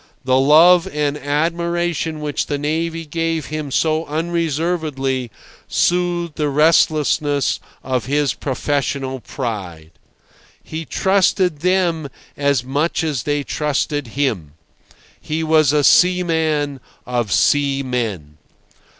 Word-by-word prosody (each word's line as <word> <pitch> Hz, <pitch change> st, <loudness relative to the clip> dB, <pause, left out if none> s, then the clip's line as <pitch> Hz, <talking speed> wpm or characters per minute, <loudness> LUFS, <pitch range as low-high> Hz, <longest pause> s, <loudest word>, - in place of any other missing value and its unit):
The 130 Hz, 0 st, +3 dB
love 165 Hz, +5 st, +6 dB
and 150 Hz, -1 st, -1 dB
admiration 165 Hz, +2 st, -1 dB
which 150 Hz, -1 st, -2 dB
the 145 Hz, -, -1 dB
navy 165 Hz, +3 st, -2 dB
gave 165 Hz, 0 st, -2 dB
him 155 Hz, -2 st, -5 dB
so 155 Hz, +3 st, +1 dB
unreservedly 155 Hz, -5 st, -1 dB, 0.4 s
soothed 175 Hz, -2 st, 0 dB
the 150 Hz, -1 st, 0 dB
restlessness 145 Hz, -3 st, +2 dB, 0.2 s
of 130 Hz, -3 st, -2 dB
his 145 Hz, -1 st, +1 dB
professional 135 Hz, 0 st, -2 dB
pride. 95 Hz, -, -6 dB, 0.7 s
He 160 Hz, +1 st, -6 dB
trusted 185 Hz, -4 st, +1 dB
them 175 Hz, -4 st, 0 dB, 0.3 s
as 140 Hz, -4 st, +1 dB
much 145 Hz, +7 st, -1 dB
as 150 Hz, -6 st, -1 dB
they 145 Hz, +2 st, -1 dB
trusted 145 Hz, -1 st, -2 dB
him. 100 Hz, -, -1 dB, 0.7 s
He 160 Hz, +1 st, -3 dB
was 155 Hz, -3 st, +4 dB
a 150 Hz, -1 st, +2 dB
seaman 160 Hz, -5 st, +2 dB, 0.3 s
of 120 Hz, -4 st, -2 dB
seamen. 125 Hz, -, 0 dB
150 Hz, 105 wpm, -19 LUFS, 135-165 Hz, 0.7 s, love